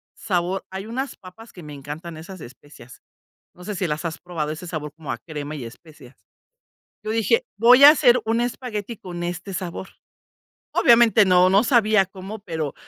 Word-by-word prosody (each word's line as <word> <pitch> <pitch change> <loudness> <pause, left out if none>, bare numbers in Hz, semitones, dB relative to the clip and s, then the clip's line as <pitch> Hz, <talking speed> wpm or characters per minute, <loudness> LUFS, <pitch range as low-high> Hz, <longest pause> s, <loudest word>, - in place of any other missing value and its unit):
sabor" 180 -1 -2
hay 190 +1 -7
unas 260 +5 -5
papas 210 +5 -15
que 175 - -12
me 150 -1 -10
encantan, 150 +4 -8
esas 180 +4 -10
de - - -9
especias, 130 0 -16 0.5
¿no 180 - -15
sé 210 +2 -5
si 185 -1 -2
las 155 +2 -4
has 165 -1 -4
probado?, 160 -4 -4
ese 155 +3 -8
sabor 155 -3 -5
como 160 -5 -7
a 120 - -3
crema 150 +3 -7
y 135 -5 -7
especias. 135 +1 -14 0.9
Yo 215 - -3
dije: 345 - +1
"Voy 245 +5 +6
a 285 - +12
hacer 250 -5 +4
un 225 +1 0
espagueti 235 -3 -5
con 175 -2 -7
este 175 +3 -5
sabor". 185 0 -6 0.8
Obviamente, 230 -3 +5
no, 180 0 +5
no 195 +3 +4
sabía 215 -5 +3
cómo, 190 +3 -9
pero 160 -7 -5
185 Hz, 180 wpm, -22 LUFS, 155-220 Hz, 0.9 s, a